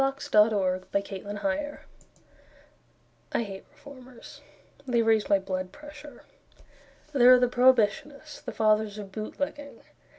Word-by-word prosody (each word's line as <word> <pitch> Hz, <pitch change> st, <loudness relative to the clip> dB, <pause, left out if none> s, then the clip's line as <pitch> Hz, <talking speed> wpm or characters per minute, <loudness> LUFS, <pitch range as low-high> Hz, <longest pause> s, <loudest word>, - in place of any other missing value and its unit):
] -, -, -8 dB
DOROTHY 195 Hz, -4 st, +3 dB
PARKER 205 Hz, +10 st, -3 dB, 1.5 s
I -, -, +1 dB
hate 195 Hz, -3 st, -9 dB
Reformers; 255 Hz, -4 st, -14 dB, 0.5 s
They 235 Hz, -2 st, +2 dB
raise 220 Hz, -1 st, +2 dB
my 200 Hz, -, +5 dB
blood 185 Hz, -1 st, -5 dB
pressure. 295 Hz, -1 st, -13 dB, 0.9 s
There 250 Hz, -2 st, +6 dB
are -, -, +3 dB
the 250 Hz, -, +3 dB
Prohibitionists; 260 Hz, +4 st, +1 dB
The 245 Hz, -, -6 dB
Fathers 215 Hz, -1 st, +1 dB
of 200 Hz, -2 st, -8 dB
Bootlegging. 280 Hz, +7 st, -6 dB
230 Hz, 110 wpm, -27 LUFS, 205-280 Hz, 1.5 s, There